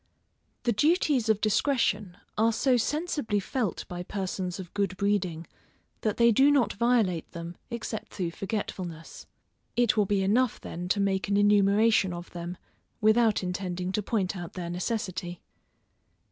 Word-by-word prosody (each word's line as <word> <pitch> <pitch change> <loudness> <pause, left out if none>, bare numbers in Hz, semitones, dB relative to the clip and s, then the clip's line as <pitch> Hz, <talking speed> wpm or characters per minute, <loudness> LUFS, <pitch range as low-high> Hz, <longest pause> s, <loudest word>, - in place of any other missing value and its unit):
_ - - -47
The 240 - +2
duties 290 - +2
of 215 -1 +3
discretion 210 -4 +1 0.2
are 225 +1 +3
so 250 +3 +2
sensibly 290 -4 0
felt 215 - -2
by 175 0 -5
persons 185 -1 -4
of 180 -2 -8
good 195 -2 -1
breeding, 185 -5 0 0.6
that 215 -2 -1
they 235 0 +6
do 270 +6 +5
not 280 -5 +3
violate 220 -7 +1
them 170 +1 -6
except 230 -2 -5
through 175 -4 -2
forgetfulness. 180 -4 -5 0.5
It 240 -2 +3
will 210 -3 +2
be 200 -1 +1
enough 230 +5 +2
then 175 +1 -6
to 200 +3 +1
make 195 -1 +1
an 200 0 +2
enumeration 205 0 +4
of 175 0 -8
them, 175 +1 -6 0.4
without 215 -1 +3
intending 180 0 -3
to 210 - 0
point 200 -2 -1
out 175 -2 -7
their 175 -2 -5
necessity. 185 -2 -3
200 Hz, 150 wpm, -28 LUFS, 180-230 Hz, 0.6 s, they